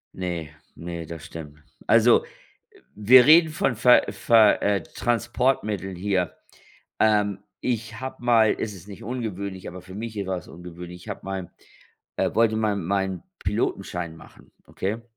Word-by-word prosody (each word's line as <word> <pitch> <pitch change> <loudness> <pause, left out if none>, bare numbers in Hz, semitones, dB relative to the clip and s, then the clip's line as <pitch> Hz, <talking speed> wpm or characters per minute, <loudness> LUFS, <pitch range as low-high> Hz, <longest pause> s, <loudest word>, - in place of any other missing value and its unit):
Ne 85 -4 -4 0.3
ne, 85 -1 -6
das 80 -1 -9
stimmt. 75 -2 -10 0.3
Also, - - +5 0.7
wir 120 +5 +7
reden 160 +2 +7
von 150 -5 0
Ver 125 +3 +6
Ver 110 -3 +4
äh, 100 -2 +1
Transportmitteln 110 -4 -1
hier. 95 0 -1 0.7
Ähm, 105 -2 +2 0.2
ich 115 -2 -3
habe 130 -1 -7
mal 115 -3 +4
es 105 - -3
ist 95 -1 -13
nicht 100 -2 -10
ungewöhnlich, 100 -5 -5
aber 90 +1 -9
für 95 +1 -12
mich 110 +1 -6
e 100 -2 -3
war 95 -1 -1
es 90 - -10
ungewöhnlich. 90 +1 -10
Ich - - -11
habe - - -6
mal, 95 -2 -5 0.7
äh - - 0
wollte 110 -1 +3
mal 110 -2 +1
meinen 95 -1 -2 0.2
Pilotenschein 85 -2 -2
machen, - - -17 0.2
okay? 105 +5 -3
100 Hz, 150 wpm, -24 LUFS, 90-115 Hz, 0.7 s, wir